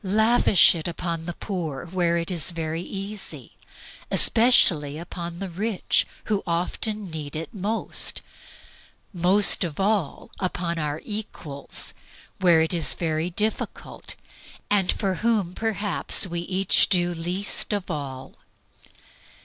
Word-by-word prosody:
Lavish 220 0 +5
it 165 -1 -4
upon 170 -1 -4
the 175 - -4
poor, 170 -8 -4
where 170 -1 0
it 170 +2 -2
is 170 -2 0
very 165 -1 -3
easy; 195 +2 -6 0.5
especially 170 - +4
upon 170 0 -6
the 195 +2 -4
rich, 195 +3 0 0.2
who 210 -2 -1
often 185 +4 -2
need 150 -2 -5
it 160 +8 -5
most; 210 +2 0 0.9
most 185 +3 +4
of 165 -2 -5
all 195 -5 -1
upon 175 -2 -2
our 150 0 -2
equals, 190 -9 -3 0.5
where 175 -4 +5
it 160 - 0
is 170 -3 +3
very 160 0 -1
difficult, 210 +5 -3 0.6
and 195 -3 +3
for 195 -2 -1
whom 215 -6 +1
perhaps 210 -2 +2
we 170 -2 -3
each 185 +2 +2
do 175 -2 +2
least 175 +4 -1
of 205 -3 -2
all. 135 -3 -6
180 Hz, 125 wpm, -24 LUFS, 165-200 Hz, 0.9 s, Lavish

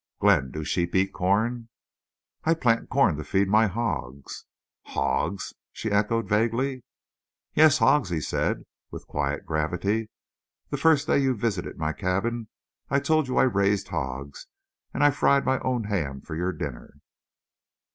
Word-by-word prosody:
"Glenn, 65 - +3
do 75 +4 -5
sheep 85 +3 -1
eat 95 +1 +2
corn?" 110 +6 0 0.7
"I 165 +1 +3
plant 120 -7 +1
corn 125 - +3
to 75 - -5
feed 95 +6 +1
my 110 +3 +4
hogs." 95 - -4 0.4
"Hogs?" 100 - -1 0.2
she 110 - -4
echoed, 105 +1 +1
vaguely. 115 +5 0 0.7
"Yes, 155 -1 +6
hogs," 145 -8 +3
he 85 -2 -1
said, - - -1 0.3
with - - -9
quiet 70 0 -2
gravity. 90 +8 -1 0.6
"The - - -1
first 155 -3 +4
day - - +3
you 135 -2 +2
visited 105 -5 -2
my 80 0 -1
cabin 110 +7 -2 0.4
I 140 - +3
told 155 0 +1
you 130 - -2
I - - +6
raised 100 -4 +1
hogs, 65 +2 -5 0.4
and 140 - 0
I 145 - +6
fried 140 0 +3
my 130 - +2
own 125 -3 -1
ham 75 -10 -2
for - - -9
your 90 +3 -1
dinner." 70 -6 -7
105 Hz, 150 wpm, -26 LUFS, 85-125 Hz, 0.7 s, Yes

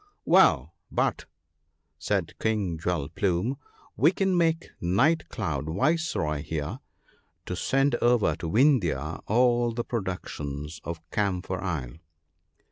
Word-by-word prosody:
"Well, - - +4 0.2
but," - - 0 0.7
said - - -1
King 100 -7 -1
Jewel 80 -4 -1
plume, 95 - 0 0.4
"we 155 +5 +5
can 190 -1 +1
make 165 -1 +1
Night 125 - +2
cloud 80 - -3
viceroy 130 - 0
here, 75 -2 -4 0.7
to 90 - -3
send 135 +8 +1
over 120 -2 +3
to 80 - -4
Vindhya 85 - +2
all 120 +1 +3
the 120 +1 -2
productions 75 - -5
of 80 -1 -7
Camphor 95 -2 -1
isle 80 -7 -4
95 Hz, 115 wpm, -27 LUFS, 80-125 Hz, 0.7 s, we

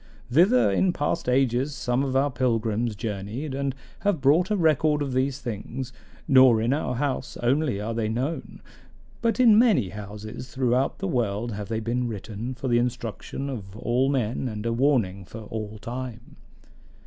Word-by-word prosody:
Thither 125 - +5
in 180 - +2
past 145 -1 -1
ages 130 +2 +1
some 125 -1 0
of 135 -1 -1
our 140 +2 +3
pilgrims 115 -3 0
journeyed, 110 +6 -4
and 135 -1 -2 0.2
have 200 -5 +1
brought 150 +7 +4
a 210 - +1
record 155 -3 +3
of 135 -2 -3
these 130 +1 +1
things; 120 +2 -5 0.3
nor 130 -4 +7
in 115 +4 +1
our 140 -4 -1
house 135 +1 -2
only 130 -3 +1
are 110 +2 -3
they 110 -1 -1
known, 130 +8 -3 0.6
but 230 +1 +1
in 225 -4 +7
many 220 - +4
houses 105 +4 -8
throughout 130 0 +1
the 195 - -3
world 120 - -1
have 105 -1 -5
they 110 -1 -1
been 120 +2 -1
written 110 +3 -5
for 130 - -5
the 120 -1 +3
instruction 120 +2 -3
of 105 -7 -6
all 125 +4 +1
men 130 -2 -1
and 105 -2 -5
a 115 - 0
warning 115 -7 +1
for 110 +5 -9
all 110 0 -6
time. 120 0 -7
125 Hz, 170 wpm, -25 LUFS, 110-140 Hz, 0.6 s, nor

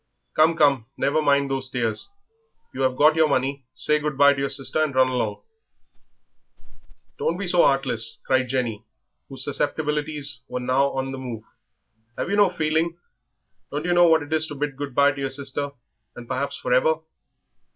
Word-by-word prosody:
"Come, 160 +2 +4
come, 140 -7 +3
never 145 +3 +1
mind 140 -2 +2
those 135 -1 -2
tears. 115 -4 -2 0.6
You 135 - -5
have 130 -1 +1
got 155 +3 +5
your 160 -1 +4
money; 135 0 -1
say 150 +3 +2
good 150 -2 -3
bye 140 0 +6
to 135 - -6
your 140 0 -1
sister 135 +4 0
and 145 -4 -2
run 130 0 +4
along." 120 -5 -2 1.8
"Don't 170 - 0
be 200 - -4
so 175 -1 +4
'eartless," 130 -5 +1
cried 130 -1 +2
Jenny, 120 -5 -2 0.5
whose - - -2
susceptibilities 150 -3 -1
were 125 - -4
now 130 +3 +1
on 135 0 -3
the 135 - -6
move. 120 -4 -6 0.7
"'Ave - - -3
yer - - +2
no 205 -2 +5
feeling; 165 0 -1 0.7
don't 150 +3 -4
yer 175 - +1
know 175 0 +6
what 160 -2 +4
it 145 +2 -6
is 155 0 +1
to 150 - -7
bid 145 0 -3
good 140 -2 -6
bye 140 0 +5
to 140 -1 -7
yer 135 - -1
sister, 140 +1 -2 0.5
and 120 - -10
perhaps 135 +2 -3
for 125 - -1
ever?" 160 +5 +4
140 Hz, 185 wpm, -23 LUFS, 130-155 Hz, 1.8 s, bye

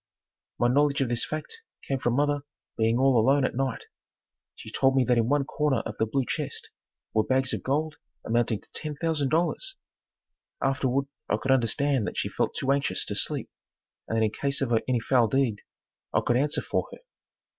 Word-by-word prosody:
My 120 - +3
knowledge 140 +2 +3
of 130 - +1
this 120 -1 0
fact 155 - -6 0.3
came 135 -1 0
from 120 -1 0
mother 145 +1 +2 0.4
being 115 +1 +2
all 130 -2 +4
alone 135 +4 +4
at - - -1
night. 135 -2 -1 0.7
She - - -10
told 135 0 +3
me 130 - +4
that 125 -1 +3
in 115 +1 +1
one 145 0 +3
corner 150 -1 0
of 110 - -6
the 110 - +2
blue 135 +3 0
chest - - -4 0.4
were 110 - +3
bags 130 +1 +1
of - - -2
gold 150 +3 -1 0.3
amounting 115 -2 +1
to - - -18
$10,000. 160 - -1 0.8
Afterward 135 0 +1 0.2
I 105 - +2
could 130 +5 -1
understand 135 0 +2
that - - -5
she - - -1
felt - - -1
too 135 - 0
anxious 140 0 +1
to - - -3
sleep - - -1 0.6
and 115 - -1
that 110 - +3
in 105 - 0
case 140 +4 -1
of 125 -3 0
any 125 -2 +2
foul 120 -1 +3
deed, 125 -4 +1 0.5
I - - +2
could 120 - +2
answer 145 +4 +1
for - - -1
her. - - -9
135 Hz, 190 wpm, -27 LUFS, 120-145 Hz, 0.8 s, all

